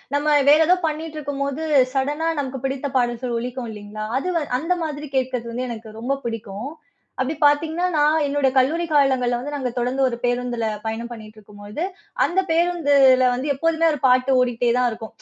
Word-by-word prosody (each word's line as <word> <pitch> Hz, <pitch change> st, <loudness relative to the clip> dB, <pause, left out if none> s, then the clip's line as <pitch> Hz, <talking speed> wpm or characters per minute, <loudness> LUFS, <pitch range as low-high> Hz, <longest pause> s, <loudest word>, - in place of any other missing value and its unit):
நம்ம 295 Hz, +1 st, +2 dB
வேறு 310 Hz, +2 st, +6 dB
ஏதோ 365 Hz, +1 st, +5 dB
பண்ணிக்கிட்டிருக்கும்போது 300 Hz, -2 st, -4 dB, 0.3 s
சடனா 290 Hz, +4 st, 0 dB
நமக்கு 265 Hz, -1 st, -4 dB
பிடித்த 270 Hz, +1 st, -2 dB
பாடல்கள் 240 Hz, 0 st, -1 dB
ஒலிக்கும் 245 Hz, -1 st, -5 dB
இல்லிங்களா? 210 Hz, +1 st, -8 dB, 0.2 s
அது 365 Hz, -, -5 dB
வ -, -, +3 dB, 0.2 s
அந்த 330 Hz, +5 st, 0 dB
மாதிரி 300 Hz, -1 st, -5 dB
கேட்கிறது 250 Hz, -2 st, -2 dB
வந்து 250 Hz, +1 st, -3 dB
எனக்கு 220 Hz, -1 st, -8 dB
ரொம்ப 265 Hz, +4 st, 0 dB
பிடிக்கும். 225 Hz, +2 st, -5 dB, 0.5 s
அப்படி 270 Hz, +4 st, -1 dB
பாத்தீங்கன்னா, 315 Hz, +4 st, +2 dB
நான் 300 Hz, +1 st, +3 dB
என்னோட 285 Hz, -1 st, +1 dB
கல்லூரி 305 Hz, +7 st, +2 dB
காலங்கள்ல 265 Hz, -5 st, +2 dB
வந்து 290 Hz, +4 st, -6 dB
நாங்க 260 Hz, -3 st, -2 dB
தொடர்ந்து 250 Hz, +3 st, -1 dB
ஒரு 235 Hz, -2 st, -3 dB
பேருந்துல 245 Hz, -1 st, -1 dB, 0.2 s
பயணம் 225 Hz, +2 st, -4 dB
பண்ணிகிட்டுருக்கும்பொழுது, 215 Hz, -, -8 dB, 0.4 s
அந்த 355 Hz, +2 st, +1 dB
பேருந்துல 285 Hz, -6 st, +4 dB
வந்து 255 Hz, +4 st, -3 dB
எப்போதுமே 330 Hz, +3 st, +1 dB
ஒரு 295 Hz, -, -3 dB
பாட்டு 255 Hz, +1 st, +3 dB
ஓடிகிட்டே 245 Hz, -1 st, +1 dB
தான் 250 Hz, -1 st, +2 dB
இருக்கும். 220 Hz, 0 st, -8 dB
265 Hz, 160 wpm, -22 LUFS, 240-295 Hz, 0.5 s, வேறு